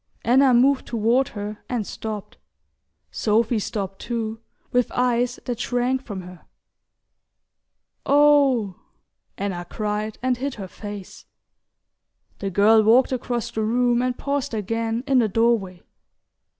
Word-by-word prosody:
Anna 260 +3 +5
moved 260 +3 +3
toward 235 +3 +2
her 205 0 -7
and 240 -4 -2
stopped. 215 -1 -6 0.7
Sophy 225 +1 +1
stopped 195 -2 -4
too, 225 -2 -3 0.3
with 250 -1 +1
eyes 245 0 +1
that 240 -2 -3
shrank 250 +1 0
from 200 -6 -6
her. 180 -1 -12 1.6
"Oh 280 -8 +4 0.3
" - - -51
Anna 190 -3 -3
cried, 210 0 -3
and 255 -1 +1
hid 270 +2 -3
her 195 -3 -7
face. 205 0 -9 1.1
The 195 - -2
girl 210 +4 +5
walked 235 +5 +4
across 245 -2 -2
the 220 - -2
room 240 +2 +2
and 250 -1 -1
paused 280 -4 -2
again 225 +3 -2
in 270 -2 +3
the 225 -3 +2
doorway. 205 -5 +1
230 Hz, 125 wpm, -23 LUFS, 210-250 Hz, 1.6 s, Anna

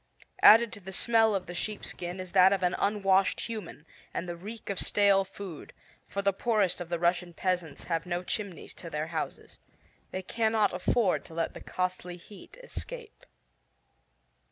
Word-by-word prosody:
Added 230 +1 +8
to 205 - -6
the 190 0 -9
smell 225 +1 +3
of 185 -2 -2
the 175 - -7
sheepskin 180 -2 -4
is 185 -1 -6
that 190 0 +7
of 195 -2 +1
an 180 0 +2
unwashed 195 -2 +2
human, 215 -9 -6 0.3
and 180 - -2
the 175 - -4
reek 210 +5 -7
of 195 - -2
stale 200 -1 +4
food, 190 -4 -9 0.3
for 200 - -3
the 200 0 +3
poorest 205 -4 +1
of 175 - -6
the 170 - 0
Russian 175 0 0
peasants 175 -6 -1
have 165 0 -2
no 175 0 -2
chimneys 200 -1 -4
to 170 - -7
their 150 -1 -2
houses. 160 - -5 0.5
They 185 - -4
cannot 220 +1 +1
afford 185 +2 +1
to 160 - -12
let 165 0 -1
the - - -9
costly 180 -1 -3
heat 200 - -14
escape. - - -8
190 Hz, 170 wpm, -29 LUFS, 175-210 Hz, 0.5 s, Added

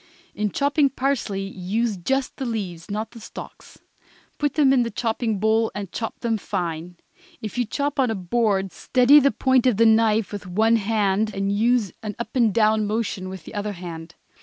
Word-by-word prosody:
In 210 0 -1
chopping 285 - +2
parsley 255 -7 -1
use 200 +4 -2
just 265 +9 -2
the 270 - -3
leaves, 190 -6 -5
not 215 +2 -3
the 235 - -12
stalks; 220 - -11 0.6
put 290 -2 0
them 280 -3 +4
in 260 - +4
the 235 - -1
chopping 225 -2 -1
bowl 220 +2 +2
and 200 -3 -5
chop 225 +4 -5
them 225 -2 0
fine. 175 -3 -4 0.4
If 215 - -6
you 245 - +2
chop 285 +5 -2
on 255 -3 +3
a 225 - -1
board 195 0 0
steady 255 +3 +5
the 280 0 +4
point 260 -2 +2
of 230 -5 +2
a 230 - +6
knife 220 -1 +3
with 205 -3 -6
one 220 +5 +3
hand 210 0 0
and 195 0 -1
use 220 -1 +2
an 210 -2 -5
up 235 - -6
and 235 -4 +4
down 215 0 +2
motion 205 -3 -2
with 190 -3 -8
the - - -10
other 205 0 -3
hand. 170 -2 -8
220 Hz, 190 wpm, -23 LUFS, 195-240 Hz, 0.6 s, a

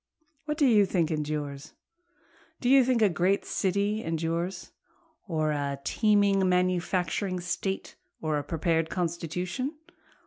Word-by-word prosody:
What 300 0 -2
do 300 - +4
you 210 -6 +5
think 170 -4 0
endures? 150 -1 -4 0.9
Do 245 - 0
you 270 0 +7
think 245 -2 +2
a - - +7
great 185 +3 +1
city 200 +3 0
endures? 165 +3 -3 0.6
Or 155 -4 0
a 140 -2 -2
teeming 200 -2 +3
manufacturing 180 +1 0
state? 180 +2 -3 0.2
or 155 -2 -1
a - - -5
prepared 165 +1 0
constitution? 180 - -3
180 Hz, 125 wpm, -28 LUFS, 160-200 Hz, 0.9 s, you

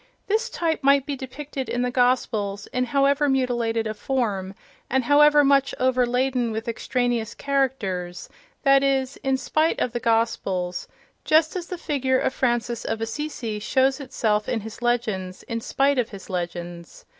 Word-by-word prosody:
This 445 +4 0
type 325 -2 -1
might 275 0 +4
be 285 - -3
depicted 270 +1 -6
in 245 - -1
the 250 - -1
Gospels, 220 -5 +1
in 250 0 +1
however 280 +3 +2
mutilated 240 -4 0
a 215 - -2
form 210 -5 -2 0.3
and 265 0 +1
however 295 +2 +6
much 275 -1 +3
overladen 250 -1 +1
with 220 +2 -4
extraneous 240 -1 -1
characters—that 270 - -1
is, 270 -1 0
in 270 -1 0
spite 310 +4 +1
of 245 - 0
the 240 - -1
Gospels; 195 -6 0 0.4
just 315 +1 +3
as 355 -2 -4
the 360 - -5
figure 265 -6 0
of 260 - 0
Francis 240 -2 0
of 225 - -2
Assisi 225 -2 -4
shows 265 +5 +2
itself 215 -6 -1
in 225 - -1
his 220 +3 -9
legends 215 -7 -1
in 230 -1 -4
spite 275 +3 +1
of 240 - 0
his 195 -2 -10
legends. 175 -1 -5
250 Hz, 155 wpm, -24 LUFS, 225-275 Hz, 0.4 s, however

